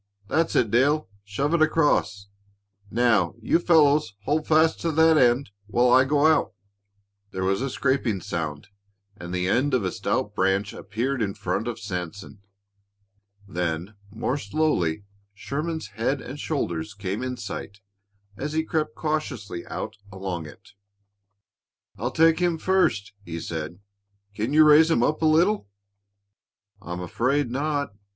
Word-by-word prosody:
That's 165 +1 +1
it, 110 -4 +2
Dale. 145 +6 +3 0.2
Shove 135 +10 -2
it 170 - +2
across. 150 -10 +2 0.6
Now, 110 -7 +2
you 115 +8 +2
fellows 150 - +3
hold 150 +6 0
fast 160 +1 +3
to 165 - 0
that 160 +1 +5
end 125 -3 +3 0.2
while 120 +3 +3
I 130 +1 +6
go 145 +2 +2
out." 155 -10 +3 0.8
There 95 -1 -4
was 95 +3 +1
a 135 - -1
scraping 130 -6 0
sound 75 -4 -5 0.5
and 85 0 -8
the 90 0 -1
end 130 +7 +2
of 115 -6 0
a 90 - -1
stout - - -2
branch 95 +2 0
appeared 120 +6 -3
in 100 -2 -1
front 95 +5 -2
of 120 - -4
Sanson. 100 0 -6 1.1
Then, 90 +1 -3 0.2
more 120 +6 -2
slowly, 100 - 0 0.3
Sherman's 150 +2 -4
head 115 +8 -1
and 140 +3 -8
shoulders 100 - -3
came 100 +1 -4
in 125 0 -3
sight 100 0 -7 0.6
as 150 +7 -4
he 160 0 +1
crept 155 -1 -2
cautiously 125 - -3
out 110 - -5
along 95 -4 -5
it. 75 - -15 1.3
"I'll 120 +4 -1
take 165 +3 +4
him 175 -2 +1
first," 160 - +1
he 85 -3 -6
said. 80 +1 -5 0.6
"Can 110 +5 -2
you 155 +1 +6
raise 155 +2 +7
him 120 -8 +3
up 155 +5 0
a - - +2
little?" 170 - +3 1.1
"I'm 90 -1 -6
afraid 125 +8 0
not. 145 -2 -1
120 Hz, 145 wpm, -25 LUFS, 100-150 Hz, 1.3 s, raise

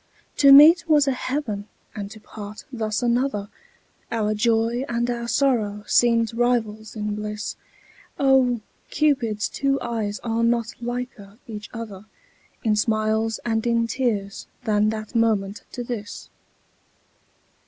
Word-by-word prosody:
To 280 -1 +7
meet 325 +5 +8
was 295 -2 +5
a - - +3
heaven 250 -6 -3 0.3
and 205 -2 -6
to 220 - -11
part 210 0 -10
thus 220 -2 -2
another, 240 -4 0 0.6
Our 215 -2 0
joy 230 +3 +1
and 235 0 0
our 235 0 -4
sorrow 220 -5 +1
seemed 230 -1 +3
rivals 225 -3 -1
in 210 -1 -2
bliss; 210 0 -4 0.6
Oh! 260 -4 +3 0.3
Cupid's 250 -9 +1
two 275 0 0
eyes 220 -3 -3
are 230 0 0
not 230 -1 +1
liker 240 -4 -6
each 210 -2 -8
other 215 -4 -8 0.6
In 220 -3 +2
smiles 220 +1 0
and 225 0 0
in 230 0 +2
tears 220 -5 -2 0.2
than 210 0 +2
that 215 -1 -5
moment 215 -3 0
to 245 - -4
this. 230 -3 -7
225 Hz, 130 wpm, -23 LUFS, 210-245 Hz, 0.6 s, meet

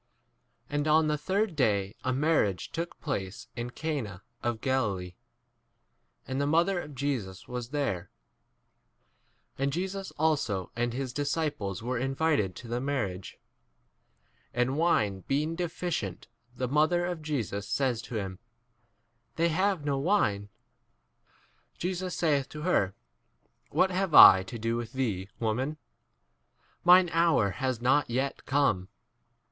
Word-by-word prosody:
And 145 +2 -1
on 155 +1 +5
the 150 - +2
third 190 +5 -1
day 100 -7 +1
a 130 - 0
marriage 130 - +1
took 170 +1 -5
place 100 - -4
in 120 0 -4
Cana 125 - -4 0.2
of 120 -2 -1
Galilee, 100 -10 -1 1.1
and 130 +1 -2
the 140 - +1
mother 170 +5 +3
of 150 -3 -10
Jesus 125 -9 -3
was 125 -1 -5
there. 135 -12 -2 1.5
2 - - -8
And 140 0 +1
Jesus 190 +4 -3
also 140 - 0
and 120 0 0
his 130 -1 -3
disciples 145 - -2
3 115 - -8
were 125 0 0
invited 135 - 0
to 120 - -10
the 120 +2 -2
marriage. 105 -10 -3 1.2
And 125 +2 +1
wine 110 - +2
being 150 +4 0
deficient, 165 - -3 0.3
the 125 0 -2
mother 155 +6 +2
of 175 -2 -3
Jesus 110 - -3
says 125 -3 0
to 120 - -8
him, 95 -3 -4 1.0
They 170 +1 +2
have 185 -1 +1
no 140 -2 +1
4 - - -2
wine. 105 - +1 1.3
Jesus 180 0 -3
saith 145 -6 +1
to 150 0 -7
her, 100 - +1 0.7
What 190 - +2
have 185 -3 0
I 95 - +11
to 95 +5 -7
do 115 +1 -1
with 120 -1 -5
thee, 105 -8 -2
woman? 125 +7 -1 1.0
5 - - -38
mine 180 0 +7
hour 165 - +3
has 130 +5 -2
not 130 +3 +2
yet 130 +3 -2
come. 120 -10 +2
135 Hz, 140 wpm, -29 LUFS, 110-160 Hz, 1.5 s, I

